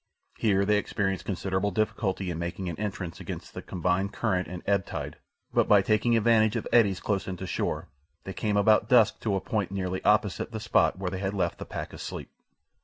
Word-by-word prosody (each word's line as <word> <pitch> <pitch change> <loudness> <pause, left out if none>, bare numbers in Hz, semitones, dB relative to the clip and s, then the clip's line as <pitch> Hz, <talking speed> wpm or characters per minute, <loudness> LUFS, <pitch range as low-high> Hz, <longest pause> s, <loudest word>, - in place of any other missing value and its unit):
Here 100 -3 +3
they 105 0 +3
experienced 95 -2 -2
considerable 95 +1 -1
difficulty 100 -2 -1
in 80 - -4
making 85 +2 -4
an 85 0 -5
entrance 95 -5 -4
against - - -7
the - - -6
combined 90 +2 -1
current 95 -6 0
and 90 0 -7
ebb 100 -1 +2
tide, - - -5 0.4
but - - +3
by 100 -2 +6
taking 115 +3 +3
advantage 110 -1 +4
of - - -2
eddies 100 -6 +4
close 100 -2 -1
in 95 -1 -4
to 95 - -6
shore - - -2 0.4
they 95 - -6
came 105 0 0
about 105 +2 +4
dusk 120 -5 +5
to 105 -3 -1
a - - +1
point 105 -1 -2
nearly 95 -1 -3
opposite 105 +1 +2
the 110 - -4
spot 105 -3 +2
where 95 -1 -3
they 95 - -4
had 100 +1 -2
left 95 - -1
the - - -6
pack - - -6
asleep. - - -7
100 Hz, 205 wpm, -28 LUFS, 95-105 Hz, 0.4 s, by